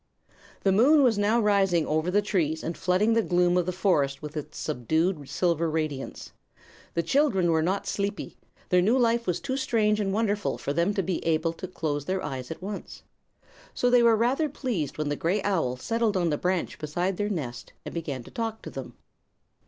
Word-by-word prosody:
The 195 - +4
moon 275 +9 +5
was 230 -5 +3
now 210 +3 +3
rising 195 -6 +3
over 155 +3 0
the 205 +3 +2
trees 160 -6 0
and 165 - -3
flooding 185 +5 +2
the 230 - +3
gloom 180 -3 +2
of 180 -1 +1
the - - +1
forest 155 -8 +1
with 150 +1 -8
its 150 - -6
subdued 155 - -1
silver 170 -2 +1
radiance. 155 -4 -4 0.6
The 170 - +1
children 195 - +2
were 160 -1 +2
not 190 +5 -1
sleepy; 200 0 -3 0.3
their 180 0 +4
new 220 +8 +3
life 235 -1 +2
was 180 -1 0
too 265 -1 -3
strange 215 -5 +1
and 195 -2 0
wonderful 210 0 0
for 140 - -3
them 170 +6 +1
to 195 - 0
be 180 0 -2
able 165 0 +1
to 185 - -7
close 150 -5 -3
their 185 +2 -2
eyes 130 -4 -5
at 160 - -7
once. 200 +1 -7 0.7
So 245 - +2
they 245 -1 +6
were 230 -1 +5
rather 260 +8 +1
pleased 230 - -3
when 150 -1 -1
the 145 - 0
gray 175 +7 0
owl 160 -11 0
settled 225 - 0
on 175 -3 +1
the - - +2
branch 180 -1 -1
beside 175 +5 -2
their 205 0 -1
nest 135 -12 -5
and - - -6
began 145 -7 -4
to - - -14
talk 225 -1 -4
to - - -7
them. - - -8
185 Hz, 200 wpm, -27 LUFS, 160-210 Hz, 0.7 s, they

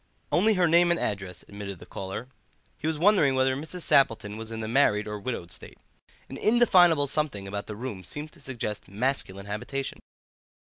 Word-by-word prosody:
"Only 210 +5 +4
her 180 -2 +3
name 170 +2 +5
and 170 - +2
address," 95 -3 -3
admitted 100 -1 -7
the 90 - -12
caller. 95 +6 -6 0.5
He 150 - -4
was 160 -1 0
wondering 165 -6 +4
whether 130 0 +2
Mrs. 160 +6 -6
Sappleton 110 -6 +2
was 115 0 -7
in 110 - -5
the 110 - -4
married 110 -4 +3
or 105 0 -4
widowed 100 -6 -5
state. - - -9 0.5
An - - -8
undefinable 180 -10 +5
something 140 -9 -2
about 100 +1 -5
the 105 - -6
room 110 -5 -6
seemed 150 - -6
to 170 - -19
suggest 120 -6 -4
masculine 100 -3 -2
habitation. 125 +7 -4
130 Hz, 180 wpm, -27 LUFS, 105-155 Hz, 0.5 s, name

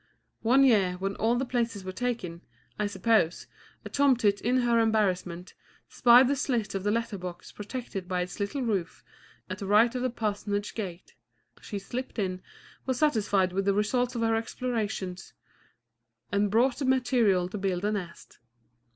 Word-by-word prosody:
One 255 +4 +4
year, 205 -8 +4
when 195 +2 -3
all 230 +2 +2
the 260 +2 0
places 230 -5 -2
were 185 - -5
taken, 185 -6 -3 0.4
I 210 - +1
suppose, 205 -5 +1 0.4
a - - -6
tomtit, 250 -8 +3
in 250 +2 +2
her 235 -1 +3
embarrassment, 185 -5 0 0.4
spied 245 +1 +6
the 280 - +1
slit 240 -6 -1
of 195 -1 -3
the 205 - +1
letter 225 -2 -1
box 180 -1 -8
protected 210 -3 -6
by 180 0 -1
its 180 +3 -6
little 205 +7 -2
roof, 195 -8 -2 0.4
at 185 0 -6
the 195 - -5
right 215 +4 +5
of 250 - -3
the 255 - 0
parsonage 205 -3 -3
gate. 185 -5 -6 0.5
She 205 - -6
slipped 245 +7 -6
in, 185 -3 -2 0.5
was 260 -2 0
satisfied 205 -10 +2
with 195 +1 -1
the 200 -1 +2
result 245 +4 0
of 235 - -2
her 225 0 +2
explorations, 220 -5 -3 1.0
and 200 +1 +2
brought 240 +5 +2
the 280 - -1
materials 235 -8 +2
to 210 - -4
build 190 -1 -1
a 210 - +1
nest. 180 -5 -7
210 Hz, 170 wpm, -28 LUFS, 190-240 Hz, 1.0 s, spied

